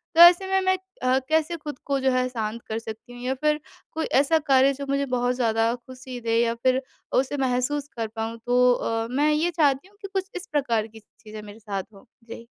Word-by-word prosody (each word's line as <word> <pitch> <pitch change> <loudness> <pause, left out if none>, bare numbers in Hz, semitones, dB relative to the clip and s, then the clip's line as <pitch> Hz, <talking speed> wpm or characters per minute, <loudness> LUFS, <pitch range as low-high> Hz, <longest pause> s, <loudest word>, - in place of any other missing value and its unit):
तो 335 - +7
ऐसे 350 +2 +8
में, 385 0 +2
मैं 375 0 +2 0.3
अ, 255 +1 +3
कैसे 320 +2 +1
ख़ुद 295 -3 -7
को 275 -1 0
जो 265 0 +2
है 255 0 +1
शांत 225 -1 -4
कर 220 +1 -2
सकती 225 +2 -9
हूँ 245 - -10
या 260 +1 0
फिर 300 0 +3 0.3
कोई 320 0 -2 0.2
ऐसा 320 +3 +3
कार्य 270 0 +5
जो 280 +1 -6
मुझे 280 0 +1
बहुत 250 -1 0
ज़्यादा 230 -1 +1
ख़ुशी 255 0 -10
दे 230 0 +1
या 230 0 +1
फिर 260 +1 +3 0.4
उसे 285 +2 -4
महसूस 265 +2 0
कर 225 -1 -1
पाऊँ 225 +1 -3
तो 250 0 +4
अ, 225 -1 -2
मैं 295 +3 +2
ये 330 +3 +1
चाहती 295 0 +2
हूँ 405 - -25
कि 395 - -5
कुछ 385 0 -2
इस 365 +1 -6
प्रकार 235 -7 0
की 220 0 -14
चीज़ें 215 0 -12
मेरे 210 +1 -12
साथ 200 -3 -4
हों। 195 - -16 0.2
जी। 230 0 -9
255 Hz, 225 wpm, -25 LUFS, 230-295 Hz, 0.4 s, ऐसे